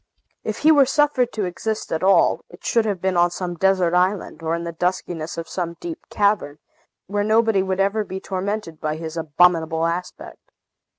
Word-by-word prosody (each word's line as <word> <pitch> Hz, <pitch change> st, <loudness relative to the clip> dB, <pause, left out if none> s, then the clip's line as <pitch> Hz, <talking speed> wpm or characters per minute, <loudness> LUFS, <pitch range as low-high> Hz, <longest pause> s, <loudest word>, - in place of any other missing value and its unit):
If -, -, -3 dB
he 315 Hz, -, +5 dB
were 285 Hz, -4 st, +6 dB
suffered 270 Hz, -3 st, +2 dB
to 210 Hz, -3 st, -1 dB
exist 215 Hz, +5 st, -4 dB
at 160 Hz, -, -1 dB
all, 195 Hz, +1 st, +3 dB
it -, -, -15 dB
should 230 Hz, -2 st, +2 dB
have 200 Hz, -4 st, -1 dB
been 190 Hz, -1 st, 0 dB
on 175 Hz, 0 st, +4 dB
some 175 Hz, 0 st, -4 dB
desert 185 Hz, 0 st, +2 dB
island, 185 Hz, 0 st, 0 dB
or 165 Hz, 0 st, -1 dB
in 170 Hz, -, -4 dB
the 170 Hz, -, -4 dB
duskiness 170 Hz, -1 st, -3 dB
of 165 Hz, -1 st, -5 dB
some 170 Hz, -2 st, -4 dB
deep 340 Hz, -1 st, -8 dB
cavern, 200 Hz, -8 st, +1 dB, 0.5 s
where 205 Hz, +1 st, -1 dB
nobody 220 Hz, -1 st, +3 dB
would 190 Hz, 0 st, -2 dB
ever 200 Hz, +2 st, +1 dB
be 190 Hz, -1 st, -6 dB
tormented 190 Hz, -3 st, -4 dB
by 155 Hz, -1 st, -1 dB
his 160 Hz, 0 st, -6 dB
abominable 165 Hz, 0 st, +2 dB
aspect. 175 Hz, +2 st, -4 dB
185 Hz, 185 wpm, -22 LUFS, 170-210 Hz, 0.5 s, were